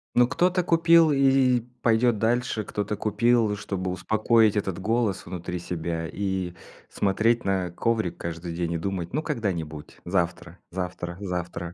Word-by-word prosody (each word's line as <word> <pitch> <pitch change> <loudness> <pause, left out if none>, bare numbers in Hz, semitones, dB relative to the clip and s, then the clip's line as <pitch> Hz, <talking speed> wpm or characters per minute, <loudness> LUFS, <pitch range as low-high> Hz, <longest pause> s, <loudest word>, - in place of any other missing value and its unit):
Ну 120 0 +5
кто-то 180 +6 +1
купил 165 -1 +5
и 135 -3 +4 0.2
пойдёт 115 0 +3
дальше, 115 0 0
кто-то 105 +1 -3
купил, 110 +1 +2
чтобы 95 -3 -3
успокоить 110 +3 +2
этот 95 -3 -2
голос 110 0 0
внутри 90 0 -5
себя, 85 -1 -3
и 95 -2 -2 0.3
смотреть 110 +4 +1
на 95 -2 0
коврик 110 0 -1
каждый 85 0 -5
день 85 -1 -2
и - - 0
думать: 90 0 -4
"Ну 150 - 0
когда-нибудь, 90 - -4
завтра 85 -1 -2
завтра 90 -1 -4
завтра". 90 -2 -4
100 Hz, 140 wpm, -25 LUFS, 90-115 Hz, 0.3 s, Ну